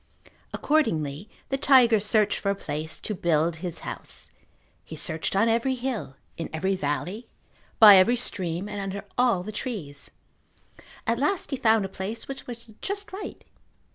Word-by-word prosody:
Accordingly 170 - 0 0.2
the 270 - -1
tiger 250 -5 +6
searched 210 0 +2
for 200 - -1
a 200 - +1
place 155 -3 -5
to 215 - -3
build 170 -2 +1
his 175 0 -6
house. - - -7 0.5
He - - -9
searched 160 +4 -2
on 215 +4 +4
every 235 +3 +1
hill, 240 - -4 0.2
in 165 - -4
every 190 +5 0
valley, 150 - -3 0.5
by 210 -3 +10
every 220 +6 +5
stream, 185 -5 -2
and 205 -1 -5
under 195 +1 -5
all 240 -8 +2
the 215 - -6
trees. 200 - -6 1.0
At 230 +1 +1
last 310 +6 0
he - - +1
found 220 -4 +3
a - - -2
place 195 +4 -6
which 270 0 -7
was 235 -2 -9
just 405 0 -4
right. 390 +1 -7
210 Hz, 160 wpm, -26 LUFS, 175-240 Hz, 1.0 s, by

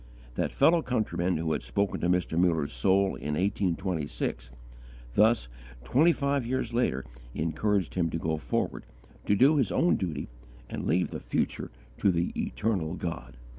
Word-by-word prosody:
That - - -1
fellow 170 0 +4
countryman 90 - 0
who 80 0 -1
had 75 - 0
spoken 90 +12 -1
to 85 - +1
Mr. 90 -2 +1
Muller's 85 -4 +2
soul 95 +10 +2
in 75 0 -3
1826, 85 -9 -1 0.6
thus 110 - +4 0.4
twenty 150 - +4
five 140 -3 0
years 120 -1 -2
later 90 - 0 0.3
encouraged 90 +4 0
him 85 -3 +1
to 80 - -2
go 80 -1 -1
forward, - - -2 0.4
to 100 - +4
do 140 +8 +5
his 135 - +2
own 175 - +3
duty 80 -7 -3 0.4
and - - -5
leave 90 +3 +1
the - - -4
future - - -2 0.3
to - - +3
the 85 0 -1
Eternal 90 -7 -1
God. 65 -9 -5
90 Hz, 155 wpm, -28 LUFS, 80-110 Hz, 0.6 s, do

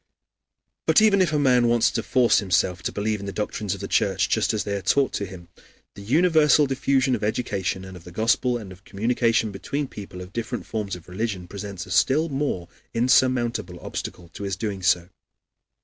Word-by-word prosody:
But - - +6
even 210 -3 +5
if 175 -4 +2
a 150 - +1
man 125 -4 +4
wants 120 -1 +3
to - - -1
force 125 -4 +3
himself 90 -2 +1
to - - -3
believe 105 +1 -1
in 100 - -7
the - - -3
doctrines 105 -1 -3
of - - -10
the - - -4
Church - - +1
just - - +2
as 110 - -1
they 100 - -2
are 100 - -3
taught 135 +8 +2
to 100 - -2
him, 90 -2 -11 0.5
the - - -11
universal 155 - +4
diffusion 135 -1 +1
of 120 - -2
education 100 -4 -2
and 95 0 -10
of 90 - -12
the 90 - -11
Gospel 120 +5 +1
and 105 -5 -9
of 90 +1 -14
communication 115 +1 +1
between 140 +8 -3
people 95 -6 -9
of 90 +2 -10
different 115 +1 -4
forms 105 -4 -3
of 90 - -13
religion 95 -1 -3
presents 100 -2 -6
a 90 - -11
still 150 - +3
more 135 -11 -2 0.3
insurmountable 120 -6 +2
obstacle 85 0 -6
to - - -11
his 100 -2 -2
doing 100 0 -4
so. 90 -1 +2
105 Hz, 200 wpm, -24 LUFS, 95-125 Hz, 0.5 s, But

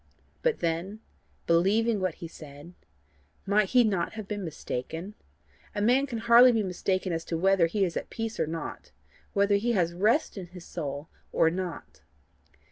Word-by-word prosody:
But 485 -2 0
then: 170 +6 -2 0.5
believing 205 +6 +3
what 185 -3 -1
he 170 - -7
said, 150 +1 -12 0.7
might 200 0 +2
he 250 -1 +5
not 195 -6 0
have 215 -2 -7
been 205 -1 -4
mistaken? 165 +3 -5 0.6
A 205 - -1
man 255 +5 +3
can 240 -4 -4
hardly 235 +2 +7
be 225 -3 +1
mistaken 185 0 -1
as 165 0 -2
to 165 - -2
whether 190 -1 +4
he 195 +3 +1
is 170 - -4
at - - -4
peace 225 -1 -4
or - - +1
not 165 +1 -6 0.4
whether 200 0 +3
he 235 +4 0
has 170 -5 +1
rest 215 - +1
in 180 - -7
his 180 0 -12
soul 145 -2 -5 0.2
or 160 - +3
not. 180 -1 -6
190 Hz, 170 wpm, -28 LUFS, 170-215 Hz, 0.7 s, hardly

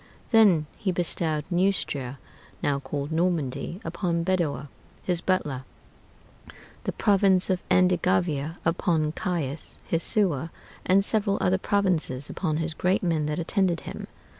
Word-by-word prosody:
Then 200 -9 +5
he 190 - -1
bestowed 160 -3 0
Neustria, 175 -8 0 0.5
now 140 -1 +1
called 145 +1 -4
Normandy, 165 -1 -1
upon 170 0 -1
Bedoer, 165 -6 0 0.4
his 175 -2 +1
butler; 150 -9 0 1.2
the - - 0
province 195 -2 +3
of 185 0 0
Andegavia 180 -4 +2
upon 165 -2 +1
Caius, 160 -4 -3
his 165 - 0
sewer; 170 - +1 0.4
and 195 +2 +4
several 205 -2 +2
other 190 +1 +2
provinces 180 -10 0
upon 155 -5 -1
his 165 0 -2
great 180 +5 +1
men 160 -4 +1
that 150 0 -2
attended 175 0 0
him. - - -7
170 Hz, 125 wpm, -26 LUFS, 155-185 Hz, 1.2 s, Then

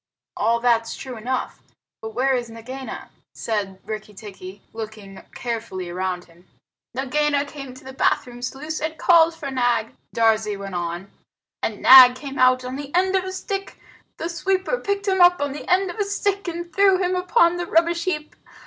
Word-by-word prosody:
"All 230 +2 +1
that's 230 -1 +1
true 260 -2 -7
enough. 250 +4 -4 0.4
But 220 0 -7
where's 250 -1 +1
Nagaina?" 255 +4 -8 0.3
said 200 -4 -3
Rikki 215 -1 -7
tikki, 195 -2 -10
looking 215 -3 -8
carefully 220 -7 -4
round 180 0 -3
him. 170 +2 -23 0.5
"Nagaina 285 +2 +1
came 275 -3 -9
to - - -14
the 265 0 -9
bathroom 245 -2 0
sluice 280 +5 -5
and 315 +1 -3
called 335 -1 +5
for 280 -4 -6
Nag," 245 -3 0 0.2
Darzee 220 -2 +2
went 195 -1 -7
on, 175 +2 -4 0.5
"and - - -3
Nag 255 -1 +10
came 275 +1 -7
out 255 0 +4
on 255 +1 -5
the 285 -1 -7
end 375 +1 +2
of 375 -1 +1
a 375 - -4
stick 390 +1 -5 0.4
the 330 - -3
sweeper 380 +7 -1
picked 400 0 -2
him 380 -1 +2
up 355 0 +6
on 285 -1 -1
the 290 - -8
end 370 0 +3
of 435 - -11
a - - +3
stick 400 -1 -1
and 345 0 -5
threw 390 0 +5
him 365 0 0
upon 360 -1 +3
the 350 - -3
rubbish 335 +1 +2
heap. 305 -5 -3
265 Hz, 175 wpm, -22 LUFS, 220-345 Hz, 0.5 s, Nag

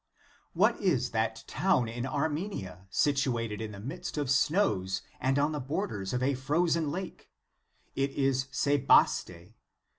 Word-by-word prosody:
* - - -32
What - - +2
is 140 - +1
that 110 0 -1
town 180 -11 +1
in 120 +3 -4
Armenia, 145 - -3
situated 120 -4 0
in 110 -1 -4
the 100 - -9
midst 160 - -6
of 145 -3 0
snows, 135 - +1 0.2
and 130 +2 +1
on 145 +2 +2
the 150 - -3
borders 130 - -3
of 125 0 -1
a 140 +2 +2
frozen 155 +4 +1
lake? 185 +4 -6 0.7
It 135 +1 +1
is 135 -1 0
Sebaste. 130 - +2
135 Hz, 145 wpm, -30 LUFS, 115-150 Hz, 0.7 s, What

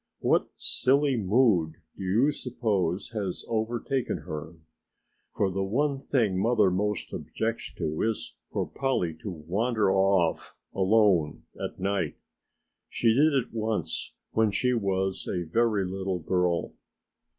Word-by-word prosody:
What - - +2
silly 140 +1 +2
mood 100 -6 +3 0.2
do - - -7
you 110 +10 +3
suppose 105 - -1
has 100 -5 -3
overtaken 120 +3 -1
her? 75 +2 -6 0.8
For 100 -2 +1
the 95 +1 -2
one 135 +8 0
thing 110 -9 +1
mother 110 -4 +3
most 105 +3 -1
objects - - -3
to 80 0 -2
is 110 -1 -2
for - - -2
Polly 130 -12 -1
to 105 - -5
wander 100 +6 0
off 95 -3 +1 0.2
alone 95 -5 +3 0.2
at - - -5
night. 95 -5 -1 0.7
She 115 -2 +2
did 150 +5 +4
it 135 -5 0
once 110 -1 -2 0.2
when 110 -1 +3
she 125 +5 +1
was 95 -3 -1
a 90 - -1
very 105 +3 +1
little 95 0 -2
girl." 90 +1 0
100 Hz, 130 wpm, -27 LUFS, 95-115 Hz, 0.8 s, did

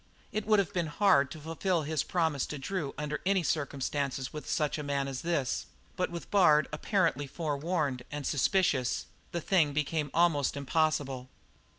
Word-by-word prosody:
It 215 -1 -3
would 215 -1 +5
have 200 0 0
been 175 -4 0
hard 150 -5 +4
to 155 - -8
fulfil 165 +2 -1
his 155 -1 0
promise 160 -6 0
to 150 - -5
Drew 145 +1 -3
under 150 0 -3
any 190 -1 +2
circumstances 140 -3 -2
with 150 - -7
such 150 -1 0
a - - -3
man 140 -1 -1
as 135 -2 -4
this; 165 -7 -1 0.3
but 180 -1 0
with 170 0 -7
Bard 155 -7 +5
apparently 155 - +1
forewarned 150 -2 -1
and 150 -1 -4
suspicious 140 -4 +1 0.3
the 170 - -2
thing 155 -5 +3
became 150 0 -1
almost 155 -5 +2
impossible. 140 -3 0
150 Hz, 165 wpm, -30 LUFS, 140-175 Hz, 0.3 s, would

